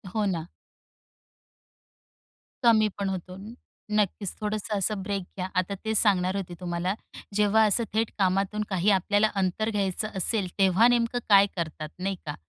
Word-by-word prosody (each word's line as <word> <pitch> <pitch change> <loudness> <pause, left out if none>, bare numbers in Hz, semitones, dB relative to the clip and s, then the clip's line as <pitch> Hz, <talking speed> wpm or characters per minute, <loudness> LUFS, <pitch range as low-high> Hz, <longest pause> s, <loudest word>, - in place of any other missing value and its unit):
हो 215 -1 +1
ना. 170 -4 -2 2.2
कमी 220 -2 +5
पण 195 -1 -1
होतो. 185 0 -6 0.6
नक्कीच, 200 -2 0
थोडंसं 210 0 -2
असं 200 +1 0
ब्रेक 200 -1 -2
घ्या. 185 0 -2
आता 185 +2 0
तेच 220 -1 +1
सांगणार 185 -3 +2
होते 185 -3 -4
तुम्हाला. 175 +1 -2 0.4
जेव्हा 210 +1 +4
असं 215 +3 +3
थेट 220 0 0
कामातून 195 +2 +1
काही 190 0 +1
आपल्याला 205 +3 +2
अंतर 195 +3 0
घ्यायचं 205 0 -1
असेल, 190 +1 +1
तेव्हा 195 +4 +5
नेमकं 240 0 +1
काय 200 -1 +7
करतात, 155 -3 -4
नाही 195 +1 -2
का? 150 - -4
200 Hz, 145 wpm, -26 LUFS, 185-215 Hz, 2.2 s, काय